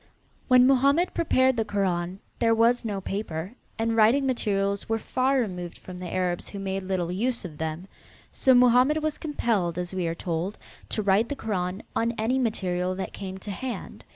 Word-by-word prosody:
When 255 Hz, -1 st, +6 dB
Mohammed 275 Hz, +6 st, +3 dB
prepared 260 Hz, -6 st, +2 dB
the 225 Hz, -, +2 dB
Koran 185 Hz, -3 st, -1 dB, 0.2 s
there 230 Hz, -1 st, +3 dB
was 235 Hz, +2 st, +3 dB
no 205 Hz, -4 st, -3 dB
paper, 190 Hz, -2 st, -4 dB, 0.2 s
and 225 Hz, 0 st, 0 dB
writing 230 Hz, +5 st, +4 dB
materials 200 Hz, -6 st, 0 dB
were 225 Hz, -, +2 dB
far 260 Hz, +4 st, +1 dB
removed 180 Hz, -7 st, -4 dB
from 180 Hz, -1 st, -10 dB
the 180 Hz, -2 st, -6 dB
Arabs 180 Hz, -1 st, -1 dB
who 200 Hz, -, -7 dB
made 195 Hz, 0 st, -3 dB
little 185 Hz, -2 st, -2 dB
use 235 Hz, +4 st, -1 dB
of 155 Hz, -4 st, -9 dB
them. 160 Hz, +3 st, -4 dB, 0.4 s
So 260 Hz, -1 st, +4 dB
Mohammed 250 Hz, +5 st, +5 dB
was 310 Hz, -1 st, -1 dB
compelled, 220 Hz, -, -1 dB
as 180 Hz, +1 st, -3 dB
we 185 Hz, -2 st, -1 dB
are 165 Hz, -, -2 dB
told, 175 Hz, +3 st, -3 dB, 0.3 s
to 215 Hz, -, -2 dB
write 200 Hz, +4 st, +3 dB
the 285 Hz, -, -2 dB
Koran 190 Hz, -5 st, -3 dB
on 230 Hz, +1 st, +1 dB
any 230 Hz, +3 st, 0 dB
material 185 Hz, -6 st, -1 dB
that 190 Hz, -, -5 dB
came 190 Hz, -1 st, -6 dB
to 200 Hz, +2 st, -6 dB
hand. 250 Hz, +6 st, -6 dB
205 Hz, 180 wpm, -26 LUFS, 185-245 Hz, 0.4 s, When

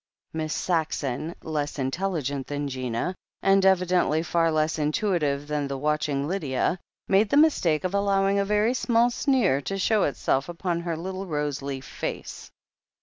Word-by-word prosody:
Miss 155 Hz, -1 st, -3 dB
Saxon, 160 Hz, -3 st, -1 dB
less 150 Hz, -2 st, -3 dB
intelligent 140 Hz, -1 st, -2 dB
than 145 Hz, 0 st, -3 dB
Gina, 130 Hz, +4 st, -2 dB, 0.3 s
and 195 Hz, 0 st, +4 dB
evidently 180 Hz, -4 st, +3 dB
far 165 Hz, -1 st, +2 dB
less 155 Hz, 0 st, 0 dB
intuitive 150 Hz, -3 st, 0 dB
than 150 Hz, -1 st, -1 dB
the 140 Hz, 0 st, -3 dB
watching 145 Hz, -1 st, 0 dB
Lydia, 165 Hz, -1 st, -1 dB, 0.3 s
made 200 Hz, +2 st, +3 dB
the 285 Hz, -, +3 dB
mistake 190 Hz, -, +3 dB
of 185 Hz, +1 st, -2 dB
allowing 200 Hz, 0 st, +2 dB
a -, -, +3 dB
very 210 Hz, +4 st, +2 dB
small 240 Hz, -1 st, +2 dB
sneer 240 Hz, -, +2 dB
to 195 Hz, +7 st, -3 dB
show 210 Hz, +2 st, +2 dB
itself 135 Hz, 0 st, 0 dB
upon 175 Hz, 0 st, -2 dB
her 170 Hz, -1 st, -3 dB
little 190 Hz, +3 st, -5 dB
roseleaf 140 Hz, -3 st, -3 dB
face. -, -, -6 dB
165 Hz, 145 wpm, -26 LUFS, 145-195 Hz, 0.3 s, and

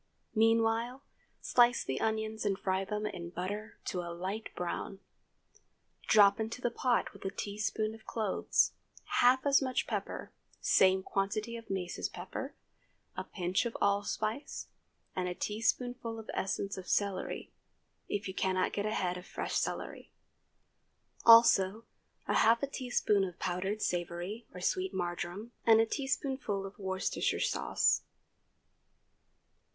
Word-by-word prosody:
Meanwhile, 225 Hz, +3 st, +2 dB, 0.4 s
slice 240 Hz, -1 st, +4 dB
the 130 Hz, -, -3 dB
onions 220 Hz, 0 st, -1 dB
and 200 Hz, -2 st, +1 dB
fry 190 Hz, 0 st, 0 dB
them 210 Hz, +2 st, -3 dB
in 180 Hz, -5 st, -5 dB
butter 205 Hz, +5 st, -5 dB
to 185 Hz, -, -2 dB
a 170 Hz, -, -6 dB
light 190 Hz, +6 st, -4 dB
brown. 180 Hz, +2 st, -3 dB, 1.1 s
Drop 205 Hz, -1 st, +6 dB
into 220 Hz, +2 st, -3 dB
the 240 Hz, -1 st, 0 dB
pot 245 Hz, 0 st, +1 dB
with -, -, -13 dB
a 195 Hz, -, -1 dB
teaspoonful 215 Hz, +2 st, -2 dB
of 220 Hz, 0 st, -14 dB
cloves, 215 Hz, -4 st, +1 dB, 0.5 s
half 255 Hz, +2 st, +5 dB
as 280 Hz, 0 st, +5 dB
much 260 Hz, -1 st, 0 dB
pepper, -, -, -4 dB, 0.3 s
same 190 Hz, 0 st, +4 dB
quantity 205 Hz, +5 st, -1 dB
of 230 Hz, -1 st, -9 dB
mace 180 Hz, -2 st, -3 dB
as -, -, -1 dB
pepper, -, -, -6 dB, 0.6 s
a -, -, -3 dB
pinch 180 Hz, -1 st, -1 dB
of 230 Hz, -, -6 dB
allspice, 210 Hz, +5 st, -1 dB, 0.5 s
and 180 Hz, -1 st, -1 dB
a 180 Hz, -, -4 dB
teaspoonful 230 Hz, +3 st, -1 dB
of 225 Hz, -, -7 dB
essence 195 Hz, +1 st, -2 dB
of 185 Hz, -, -10 dB
celery, 200 Hz, -2 st, -1 dB, 0.6 s
if 205 Hz, -1 st, -2 dB
you 190 Hz, -, -4 dB
cannot 185 Hz, -1 st, 0 dB
get 205 Hz, +1 st, -1 dB
a 215 Hz, -, -1 dB
head 180 Hz, -1 st, 0 dB
of 180 Hz, -, -10 dB
fresh -, -, -4 dB
celery; -, -, -3 dB, 1.2 s
also 225 Hz, -2 st, +7 dB, 0.4 s
half 230 Hz, +4 st, +4 dB
a -, -, +2 dB
teaspoonful 230 Hz, -7 st, +1 dB
of 175 Hz, -, -16 dB
powdered 190 Hz, +4 st, -2 dB
savory 175 Hz, +5 st, -3 dB
or 180 Hz, -, -9 dB
sweet 190 Hz, +1 st, 0 dB
marjoram, 175 Hz, +4 st, -3 dB
and 225 Hz, -1 st, +6 dB
a 225 Hz, -, +5 dB
teaspoonful 265 Hz, -6 st, -2 dB
of 195 Hz, +1 st, -10 dB
Worcestershire 190 Hz, -1 st, -1 dB
sauce. -, -, +2 dB
205 Hz, 135 wpm, -32 LUFS, 190-225 Hz, 1.2 s, also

